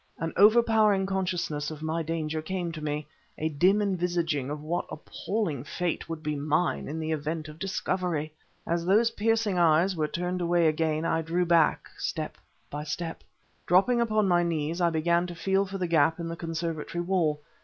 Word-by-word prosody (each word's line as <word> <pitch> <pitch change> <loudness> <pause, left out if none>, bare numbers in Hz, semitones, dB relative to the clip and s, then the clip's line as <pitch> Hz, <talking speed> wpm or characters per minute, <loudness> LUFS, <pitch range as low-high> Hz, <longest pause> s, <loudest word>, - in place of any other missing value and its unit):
An 165 0 -3
overpowering 215 -2 +5
consciousness 175 -6 -2
of 155 -1 -8
my 160 +1 -1
danger 160 -1 -2
came 175 +1 -3
to 155 -2 -7
me; 150 0 -2 0.3
a 155 - -1
dim 185 +8 +3
envisioning 170 -7 -1
of 150 +1 -4
what 170 +3 -2
appalling 165 - -3
fate 170 +3 -3
would 165 -1 -5
be 150 -1 -1
mine 155 +4 0
in 155 +3 -4
the 160 0 -2
event 155 +1 -3
of 155 +1 -11
discovery. 180 -5 -2 0.3
As 170 0 0
those 215 +6 +3
piercing 220 -3 +1
eyes 170 +3 +4
were 155 -2 0
turned 180 +3 -3
away 175 0 +2
again, 155 0 +1
I 165 0 +1
drew 170 +3 0
back, 170 -2 +3
step - - -3 0.3
my 150 0 -3
step. 165 +2 -5 0.4
Dropping 215 +7 +4
upon 215 -3 +2
my 175 -1 +4
knees, 165 0 -1
I 170 - +4
began 170 +2 +1
to 175 - -7
feel 195 +3 +1
for 195 +1 -5
the 185 - -1
gap 160 0 +3
in 170 - -3
the 165 - -4
conservatory 165 0 -3
wall. 170 -5 +1
170 Hz, 180 wpm, -28 LUFS, 155-185 Hz, 0.4 s, overpowering